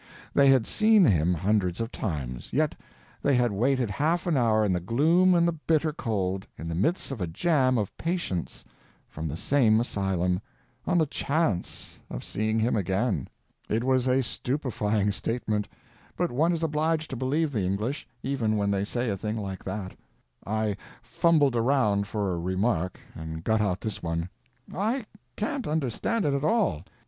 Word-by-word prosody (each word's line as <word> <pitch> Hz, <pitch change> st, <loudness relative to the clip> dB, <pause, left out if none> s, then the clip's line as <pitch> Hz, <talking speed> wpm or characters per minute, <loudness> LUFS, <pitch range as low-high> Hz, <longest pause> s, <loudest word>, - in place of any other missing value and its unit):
They 140 Hz, -1 st, +5 dB
had 130 Hz, -4 st, +5 dB
seen 215 Hz, -3 st, +5 dB
him 85 Hz, -, +3 dB
hundreds 95 Hz, 0 st, 0 dB
of 115 Hz, +1 st, -3 dB
times, 70 Hz, -, -4 dB
yet -, -, +1 dB, 0.5 s
they 140 Hz, -1 st, +3 dB
had 120 Hz, -2 st, +2 dB
waited 125 Hz, +2 st, +1 dB
half 160 Hz, -, 0 dB
an 170 Hz, -3 st, +1 dB
hour 110 Hz, -4 st, +3 dB
in 95 Hz, -, +1 dB
the 90 Hz, -, +1 dB
gloom 160 Hz, -, +3 dB
and 170 Hz, 0 st, +4 dB
the -, -, +3 dB
bitter 155 Hz, -1 st, 0 dB
cold, 95 Hz, -, -2 dB
in 80 Hz, -, -6 dB
the 85 Hz, -, -3 dB
midst 110 Hz, -, 0 dB
of 125 Hz, -7 st, -5 dB
a 90 Hz, -, -1 dB
jam 130 Hz, -, +2 dB
of 105 Hz, -3 st, -2 dB
patients 165 Hz, -, -3 dB, 0.4 s
from 80 Hz, +1 st, -5 dB
the 75 Hz, +2 st, -4 dB
same 115 Hz, -2 st, +3 dB
asylum, 95 Hz, -5 st, 0 dB, 0.5 s
on 180 Hz, -, +2 dB
the 160 Hz, -, +4 dB
chance 140 Hz, -, -2 dB
of -, -, -6 dB
seeing 110 Hz, +1 st, -1 dB
him 115 Hz, +2 st, +2 dB
again. 95 Hz, -, 0 dB, 0.4 s
It 110 Hz, +2 st, 0 dB
was 130 Hz, 0 st, +2 dB
a 130 Hz, +1 st, +3 dB
stupefying 110 Hz, -6 st, -1 dB
statement, 105 Hz, 0 st, -2 dB, 0.5 s
but 175 Hz, -, 0 dB
one 155 Hz, +8 st, +2 dB
is 165 Hz, -1 st, -1 dB
obliged 155 Hz, 0 st, 0 dB
to -, -, -3 dB
believe 145 Hz, +5 st, 0 dB
the 110 Hz, -7 st, -1 dB
English, 105 Hz, +10 st, -2 dB, 0.2 s
even 120 Hz, -6 st, 0 dB
when 100 Hz, -1 st, +1 dB
they 100 Hz, -1 st, 0 dB
say 120 Hz, +3 st, -2 dB
a 100 Hz, -, 0 dB
thing 105 Hz, +3 st, -3 dB
like 95 Hz, -3 st, -5 dB
that. 95 Hz, -3 st, -5 dB, 0.5 s
I 110 Hz, -1 st, 0 dB, 0.3 s
fumbled 150 Hz, -6 st, +3 dB
around 115 Hz, -5 st, +2 dB
for 100 Hz, -3 st, -1 dB
a 85 Hz, -, -2 dB
remark, 90 Hz, 0 st, -1 dB
and 80 Hz, 0 st, -7 dB
got 110 Hz, +1 st, +2 dB
out 95 Hz, -3 st, 0 dB
this 110 Hz, -, -4 dB
one: 85 Hz, +1 st, -2 dB, 0.4 s
"I 220 Hz, +6 st, -1 dB, 0.3 s
can't 250 Hz, +5 st, -2 dB
understand 155 Hz, -, -1 dB
it 145 Hz, -, +2 dB
at 140 Hz, 0 st, -1 dB
all. 150 Hz, -, +1 dB
115 Hz, 175 wpm, -27 LUFS, 95-145 Hz, 0.5 s, They